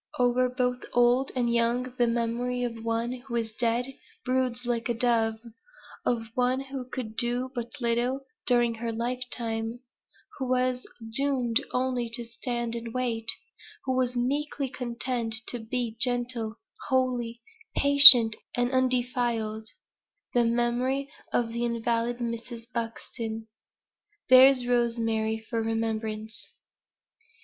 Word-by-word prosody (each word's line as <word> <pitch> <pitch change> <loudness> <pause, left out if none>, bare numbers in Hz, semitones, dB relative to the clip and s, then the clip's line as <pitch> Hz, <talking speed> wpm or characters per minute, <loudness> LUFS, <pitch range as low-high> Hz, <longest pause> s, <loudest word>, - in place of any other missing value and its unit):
Over 250 0 +2
both 250 0 -2
old 245 +2 +3
and 240 -2 0
young 240 +2 0
the 240 - +4
memory 240 +2 -1
of 230 -2 -5
one 230 +1 -1
who 250 -1 -7
is 225 -2 -2
dead 240 +3 -1 0.3
broods 255 -1 -1
like 240 0 -2
a 240 - 0
dove 230 -2 +2 0.7
of 230 -2 -1
one 250 +1 +1
who 270 -2 -7
could 225 -4 -6
do 245 +2 -1
but 240 -1 -6
little 240 +3 0 0.3
during 240 -2 +3
her 230 0 -4
lifetime 235 -1 -1 0.6
who 260 -2 -3
was 255 0 0 0.3
doomed 270 -2 +1
only 250 -2 -1
to 240 -1 -5
"stand 235 0 -4
and 230 0 -6
wait" 230 -3 -2 0.6
who 260 - 0
was 255 -1 0
meekly 275 +2 -2
content 240 -2 0
to 245 - -3
be 230 0 -3
gentle, 245 -3 -1 0.3
holy, 245 -2 -1 0.3
patient, 280 -6 +10 0.2
and 245 0 0
undefiled 240 -4 0 0.6
the 240 - +3
memory 245 +4 0 0.2
of 235 -1 0
the 235 +1 -3
invalid 235 0 -1
Mrs. 235 0 -5
Buxton. 225 -1 -5 0.8
"THERE'S 255 0 +7
ROSEMARY 225 -2 0
FOR 230 -2 -2
REMEMBRANCE." 220 -1 -4
240 Hz, 120 wpm, -27 LUFS, 230-250 Hz, 0.8 s, patient